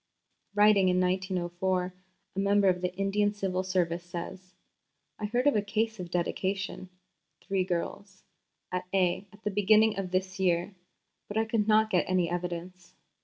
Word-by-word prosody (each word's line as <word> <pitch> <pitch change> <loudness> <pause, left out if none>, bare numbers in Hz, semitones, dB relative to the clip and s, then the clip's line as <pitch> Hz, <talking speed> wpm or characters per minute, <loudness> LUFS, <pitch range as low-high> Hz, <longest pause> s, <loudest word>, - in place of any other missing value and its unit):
Writing 205 -2 +5
in 180 0 +2
1904, 185 0 -1 0.4
a - - -2
member 200 0 +3
of 180 -1 +2
the 180 0 -1
Indian 200 +2 +1
Civil 190 -2 -1
Service 180 -2 0
says: 180 +1 -8 0.6
"I 210 - -2
heard 240 +5 0
of 290 - +4
a 210 - +3
case 220 +1 -1
of 180 -1 -6
dedication 185 +2 -2 0.5
(three 195 -1 -1
girls) 190 +2 -4 0.5
at 180 0 -2
A. 185 +1 +1
at 205 +2 -18
the 210 - -1
beginning 210 +1 +4
of 190 -2 -3
this 185 +1 -2
year, 180 +1 +1 0.5
but 205 - -4
I 220 - +2
could 220 -2 0
not 220 0 +4
get 180 - +2
any 180 -2 +1
evidence. 175 0 -5
190 Hz, 160 wpm, -29 LUFS, 180-205 Hz, 0.6 s, Writing